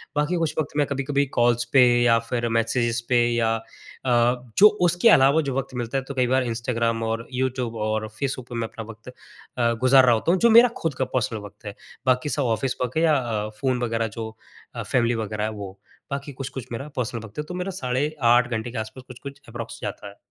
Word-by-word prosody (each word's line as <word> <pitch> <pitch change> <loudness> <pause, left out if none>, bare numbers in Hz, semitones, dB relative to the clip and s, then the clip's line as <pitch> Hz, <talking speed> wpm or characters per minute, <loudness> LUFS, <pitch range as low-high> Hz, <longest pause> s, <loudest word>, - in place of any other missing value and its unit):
बाकी 150 +4 +1
कुछ 165 -2 -1
वक़्त 150 -1 -3
मैं 145 -2 +2
कभी-कभी 140 +1 0
कॉल्स 120 0 +3
पे 130 -2 +7 0.2
या 115 -1 +5
फिर 120 -1 -1
मैसेजेस 115 +1 0
पे 120 -1 +4
या 115 -1 +1
अ, 110 - -5 1.0
जो 210 - +9
उसके 175 +5 +4
अलावा 140 -3 +5
जो 135 -3 -3
वक़्त 135 -1 -3
मिलता 120 +2 -2
है 135 - -2
तो 140 - -5
कई 130 -2 +1
बार 130 +1 +2
इंस्टाग्राम 115 0 -1
और 115 +1 -3
यू 130 +1 +1
ट्यूब 120 -2 -4
और 110 0 -1
फेसबुक 130 -3 -3
पे 120 - -6
मैं 115 -1 -2
अपना 115 - -8
वक़्त 115 +2 -12 0.5
अ, 115 -1 +2
गुज़ार 130 0 +6
रहा 120 - +5
होता 135 +10 0
हूँ, 185 - +2
जो 235 - +5
मेरा 235 +2 +8
खुद 165 -4 -2
का 130 - -1
पर्सनल 115 -3 -1
वक़्त 105 +1 -13
है। 105 -1 -6 0.3
बाकी 130 +3 +2
सब 145 - 0
ऑफिस 130 +2 -2
वर्क 125 +4 -2
है 165 - +2
या 160 - +4
अ, 110 -5 -2
फ़ोन 130 -2 +1
वगैरह 115 -1 0
जो 110 -1 -4 0.5
अ, - - -4
फ़ैमिली 120 -2 +1
वगैरह 105 -1 -3
है 110 - 0
वो। 100 -2 -8 0.3
बाकी 140 +1 -4
कुछ-कुछ 130 -1 -7
मेरा 130 +5 -5
पर्सनल 120 -3 -3
वक़्त 110 +4 -15
है, 150 - -1
तो 180 - -8
मेरा 180 +2 -3
साढ़े 130 +5 -1
8 120 +1 +5
घंटे 115 +1 -3
के 125 - -7
आस-पास 110 +4 -6
कुछ-कुछ 140 +2 -10
अप्रॉक्स 115 -1 -7
जाता 100 0 -5
है। 100 - -16
125 Hz, 230 wpm, -24 LUFS, 115-140 Hz, 1.0 s, जो